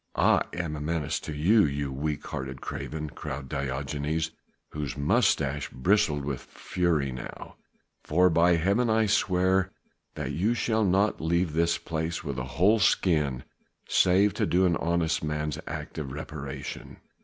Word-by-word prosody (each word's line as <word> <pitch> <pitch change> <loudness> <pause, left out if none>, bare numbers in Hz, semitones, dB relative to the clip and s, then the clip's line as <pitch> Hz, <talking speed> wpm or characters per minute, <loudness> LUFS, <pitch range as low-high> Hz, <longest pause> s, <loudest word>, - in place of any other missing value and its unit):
"I - - +4
am 85 -3 -3
a 75 - -6
menace 80 -1 -1
to - - -7
you, 100 +9 +4
you 70 -2 -1
weak 75 +2 -3
hearted 65 0 -5
craven," 75 +1 -5
cried 65 0 -6
Diogenes 70 +4 -2 0.4
whose 75 -2 -4
moustache 70 0 +1
bristled 75 0 +1
with 70 -3 -3
fury 80 -7 -1
now, 65 -1 -8 0.5
"for 90 +3 +3
by 85 +2 +4
Heaven 100 +8 +2
I 110 0 +3
swear 95 -2 +2 0.5
that - - -3
you 105 +8 +1
shall 110 -2 +1
not 100 +2 +2
leave 85 0 +1
this 85 +1 +2
place 80 +2 -3
with 70 -5 -4
a 65 - -3
whole 105 +6 +5
skin 75 -10 +2 0.4
save 95 +2 +4
to - - 0
do 95 +2 +3
an 85 -2 +3
honest 85 -1 0
man's 75 0 -2
act 75 +1 -5
of 70 -4 -5
reparation." 75 -1 -7
80 Hz, 150 wpm, -27 LUFS, 75-90 Hz, 0.5 s, whole